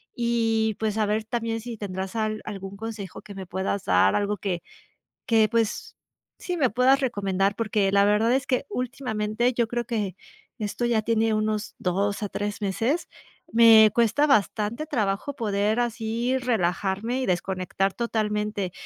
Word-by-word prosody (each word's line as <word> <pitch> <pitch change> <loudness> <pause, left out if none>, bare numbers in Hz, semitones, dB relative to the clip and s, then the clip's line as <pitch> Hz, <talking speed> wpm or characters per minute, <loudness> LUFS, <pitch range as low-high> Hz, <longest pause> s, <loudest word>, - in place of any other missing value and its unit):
y, 225 -2 +1
pues, 220 -1 -1
a 215 - +2
ver 215 +1 -1
también 230 -1 -2
si 235 0 -7
tendrás 190 0 -5
al 215 -1 -1
algún 195 -1 -7
consejo 210 -5 -7
que 205 -2 -11
me 190 -1 -6
puedas 190 +2 -2
dar, 95 +1 +3
algo 205 0 0
que 180 -4 -3 0.6
que, 220 -3 +4
pues, 230 -2 -1 0.4
sí, 360 - -4
me 270 -7 +2
puedas 260 +4 +3
recomendar, 200 -5 0
porque 210 -3 +1
la 200 0 +4
verdad 210 +3 +3
es 270 +2 +1
que 260 +1 0
últimamente, 240 -2 -1
yo 235 -2 0
creo 240 0 -2
que 210 -6 -2 0.4
esto 215 +3 -2
ya 230 -2 +2
tiene 225 0 +1
unos 215 0 -1
2 200 +3 -1
a 205 - -2
3 205 +1 -4
meses, 225 - -1 0.4
me 225 -2 +8
cuesta 235 +5 +3
bastante 225 +1 +1
trabajo 215 +2 -1
poder 210 0 0
así 235 +2 -1
relajarme 220 0 -1
y - - -1
desconectar 185 +1 -1
totalmente, 210 -4 -2
215 Hz, 155 wpm, -25 LUFS, 200-235 Hz, 0.6 s, me